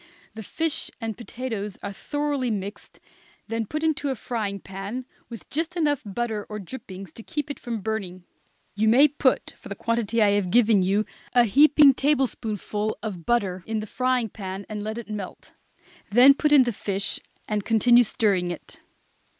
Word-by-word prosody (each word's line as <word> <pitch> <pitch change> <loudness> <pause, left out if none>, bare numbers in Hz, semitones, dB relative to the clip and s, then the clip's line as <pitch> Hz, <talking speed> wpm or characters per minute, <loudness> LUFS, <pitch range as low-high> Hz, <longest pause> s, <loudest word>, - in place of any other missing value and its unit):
The 220 - -7
fish 320 - -2
and 225 -2 -4
potatoes 225 -4 -5
are 200 - -4
thoroughly 290 +2 -2
mixed, 205 -1 -5 0.5
then 225 -1 -2
put 305 +6 -3
into 305 -3 0
a 265 - -1
frying 215 -5 -3
pan, 195 +7 -6 0.2
with 230 -2 -10
just 325 +4 -2
enough 295 -5 +1
butter 220 0 -3
or 210 - -5
drippings 195 -3 -9
to 225 - -11
keep 295 +3 -4
it - - -8
from 230 -3 -4
burning. 190 -4 -4 0.5
You 215 +1 +1
may 260 +7 +7
put, 285 -2 0
for - - -11
the - - -4
quantity 230 -1 -1
I 210 -2 +5
have 200 -3 +1
given 220 -1 +4
you, 200 +3 +1 0.3
a 245 -1 +6
heaping 285 +5 +6
tablespoonful 225 -7 -1
of 185 -7 -6
butter 195 -7 +1
in 220 0 -1
the 215 - -4
frying 250 0 0
pan, 195 -1 -6
and 210 -1 -5
let 215 +2 -4
it 235 - -7
melt; 210 -3 -7 0.6
then 250 +6 +8
put 300 +2 0
in 285 -3 +8
the 240 -2 -2
fish, 195 -1 -2 0.3
and 210 -1 -1
continue 235 +3 +5
stirring 200 -5 +1
it. 175 - -8
220 Hz, 175 wpm, -25 LUFS, 200-255 Hz, 0.6 s, then